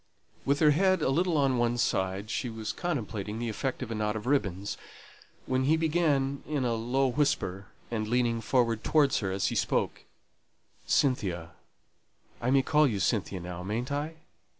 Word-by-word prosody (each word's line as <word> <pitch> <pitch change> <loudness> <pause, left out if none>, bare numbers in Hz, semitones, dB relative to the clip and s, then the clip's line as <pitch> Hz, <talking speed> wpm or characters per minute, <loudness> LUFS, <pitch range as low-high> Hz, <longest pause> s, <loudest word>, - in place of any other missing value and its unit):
With 140 +2 +1
her 150 -1 +7
head 185 +2 +3
a - - +2
little 170 +3 +2
on 135 -3 +2
one 120 0 +1
side, 95 -2 0
she 125 - -2
was 110 -1 -4
contemplating 110 - -3
the 120 0 -2
effect 130 +4 -3
of 115 - -6
a - - -1
knot 105 -1 -1
of 110 - -5
ribbons, 100 -8 0 0.7
when 130 0 0
he 155 +3 +4
began, 150 -4 +1
in 145 -4 -1
a 120 - +1
low 120 +4 +1
whisper, 100 -9 0 0.2
and 110 -2 -1
leaning 120 -1 +1
forward 115 -1 +1
towards 145 -3 +3
her 95 -3 -2
as 95 -1 0
he - - -4
spoke, - - 0 0.8
"Cynthia 90 - +1 0.9
I 120 - 0
may 135 0 +4
call 150 +1 +4
you 105 -6 -1
Cynthia 95 -1 0
now, 90 0 -6
mayn't 115 +8 -3
I? 150 +3 -2
120 Hz, 175 wpm, -29 LUFS, 105-140 Hz, 0.9 s, her